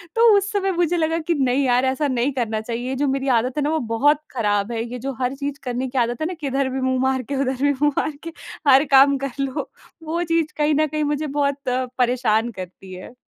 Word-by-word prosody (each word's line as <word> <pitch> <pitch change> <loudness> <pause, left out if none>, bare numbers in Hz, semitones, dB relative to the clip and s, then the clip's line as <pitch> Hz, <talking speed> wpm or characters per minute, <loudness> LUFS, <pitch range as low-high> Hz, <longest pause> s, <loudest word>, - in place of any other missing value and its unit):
तो 455 - +2 0.2
उस 400 +1 -1
समय 390 -2 0
मुझे 350 -1 +1
लगा 325 0 +1
कि 345 - +3
नहीं 270 -2 +1
यार! 250 0 +3
ऐसा 265 +3 0
नहीं 255 +1 0
करना 225 -4 -2
चाहिए। 235 +2 -4
ये 265 - -2
जो 285 +2 0
मेरी 270 0 -1
आदत 250 +4 -2
है 295 - +1
न - - 0
वो 315 +1 +1 0.2
बहुत 290 +4 +3
खराब 205 -3 0
है। 225 -1 -2
ये 245 +1 -6
जो 270 +3 -4
हर 250 +2 0
चीज़ 280 0 -5
करने 250 +1 -2
की 260 - -6
आदत 240 +1 0
है 310 - 0
न - - -6
किधर 275 -1 -1
भी 265 +1 -3
मुँह 260 0 0
मार 265 0 +1
के - - 0
उधर 260 -1 -2
भी 285 - +4
मुँह 295 - +4
मार 310 - 0
के 330 - -6 0.4
हर 270 0 +7
काम 275 +1 +6
कर 275 - -4
लो। 275 -1 -3 0.3
वो 330 +2 -2
चीज़ 330 -2 0
कहीं 300 0 +2
न 310 +1 +2
कहीं 305 0 -2
मुझे 295 +1 -1
बहुत 280 -1 -1
अ, 255 +1 0
परेशान 240 -2 +1
करती 185 -1 -10
है। 185 +6 -10
270 Hz, 255 wpm, -22 LUFS, 245-295 Hz, 0.4 s, हर